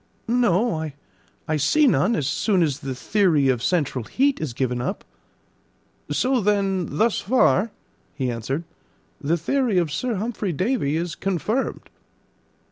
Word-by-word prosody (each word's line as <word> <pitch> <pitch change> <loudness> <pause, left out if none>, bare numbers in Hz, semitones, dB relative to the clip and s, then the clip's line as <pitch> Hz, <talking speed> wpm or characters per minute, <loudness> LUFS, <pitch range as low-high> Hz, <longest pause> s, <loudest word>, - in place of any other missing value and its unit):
"No; 220 -8 +1 0.6
I 155 - +1
see 295 - +3
none, 235 -4 +3
as 150 - -1
soon 185 - +2
as 145 -3 -1
the 135 -3 -5
theory 160 -4 +2
of 125 -3 +1
central 140 -7 0
heat 275 - +1
is 155 -5 -2
given 125 -2 -1
up." 140 +11 -3 1.1
"So 255 -1 +1
then, 195 -3 0
thus 225 +1 +2
far," 230 -2 +3 0.5
he 130 -3 -1
answered, 125 +7 -3 0.6
"the 160 +4 +1
theory 235 - 0
of 170 -4 +1
Sir 245 - -1
Humphry 210 -2 -2
Davy 180 - 0
is 170 -1 -2
confirmed." 195 +8 -2
180 Hz, 135 wpm, -23 LUFS, 145-225 Hz, 1.1 s, see